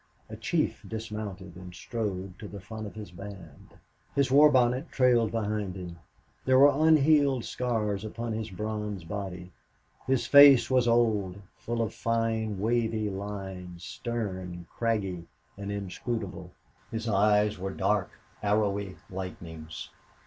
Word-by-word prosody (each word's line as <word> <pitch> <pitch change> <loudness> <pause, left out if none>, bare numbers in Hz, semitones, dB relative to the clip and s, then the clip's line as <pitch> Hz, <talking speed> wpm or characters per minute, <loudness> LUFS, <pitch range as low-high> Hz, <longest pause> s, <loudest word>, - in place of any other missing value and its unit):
A - - -5
chief - - -1
dismounted 105 -5 -6
and 90 0 -10
strode 95 -5 -4
to 105 - -7
the 100 0 -8
front 110 +2 -7
of 100 - -11
his 105 -4 -8
band. 95 -4 -11 0.4
His 140 -2 +2
war 150 +2 +8
bonnet 130 +2 +2
trailed 120 -4 +4
behind 105 -4 -2
him; 90 -2 -8 0.4
there 130 0 +4
were 145 +3 +6
unhealed 145 -4 +4
scars 110 -5 -1
upon 115 +1 -4
his 110 0 -3
bronze 105 -1 -4
body; 90 0 -6 0.6
his 130 -3 +2
face 140 -1 +8
was 125 -2 +4
old, 110 -5 +2 0.2
full 115 0 -2
of 110 - -3
fine, 115 -3 -1
wavy 110 -1 0
lines, 95 -3 -6
stern, 95 -8 -4
craggy, 100 -7 -1 0.3
and 100 0 -5
inscrutable; 100 -2 -4 0.4
his 115 +1 -4
eyes 105 0 +3
were 95 +1 -3
dark, - - 0 0.3
arrowy 100 -2 0 0.2
lightnings. 80 -4 -7
105 Hz, 130 wpm, -28 LUFS, 95-115 Hz, 0.6 s, war